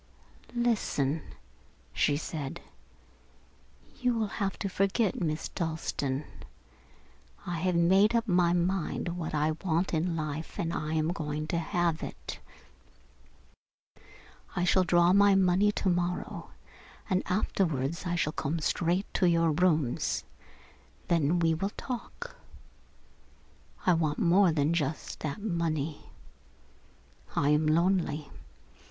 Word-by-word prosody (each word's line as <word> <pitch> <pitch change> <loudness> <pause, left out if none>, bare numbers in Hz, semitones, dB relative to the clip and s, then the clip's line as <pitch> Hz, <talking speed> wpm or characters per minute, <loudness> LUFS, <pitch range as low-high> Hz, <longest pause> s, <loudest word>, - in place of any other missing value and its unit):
"Listen," 180 - +1 0.7
she 145 -1 +2
said. 150 -3 -5 1.4
"You 250 -2 +1
will 220 - +1 0.2
have 195 -1 -1
to 200 - -2
forget 195 +2 0
Miss 155 -2 -1
Dalstan. 155 -4 -2 1.2
I 175 -2 -3
have 180 +1 +1
made 190 +6 +4
up 230 0 +1
my 175 -3 +3
mind 175 0 0
what 170 -2 -4
I 150 +1 +2
want 175 0 0
in 165 +1 0
life 155 0 -4
and 170 0 -1
I 155 0 -2
am 155 0 +1
going 155 -3 -3
to 170 - 0
have 170 -1 0
it. - - -7 2.2
I 175 - 0
shall 185 +1 +4
draw 175 0 +4
my 200 0 +6
money 190 +2 +4
to - - -2
morrow 175 0 0
morning - - -7 0.6
and 185 -2 +1
afterwards 170 -6 0
I 175 - 0
shall 155 -2 0
come 160 +4 -2
straight 175 +4 0
to 185 - +3
your 165 -1 +3
rooms. 155 -6 +1 0.9
Then 165 0 +3
we 165 -1 +3
will 195 +6 -2
talk. 275 - -6 1.5
I 180 - +5
want 155 -3 0
more 180 +1 +4
than 155 +1 +1
just 155 -2 -2
that 155 +6 -4
money. 160 -6 -2 1.3
I 145 - +2
am 150 +1 +3
lonely. 160 -2 +1
170 Hz, 120 wpm, -29 LUFS, 155-185 Hz, 2.2 s, my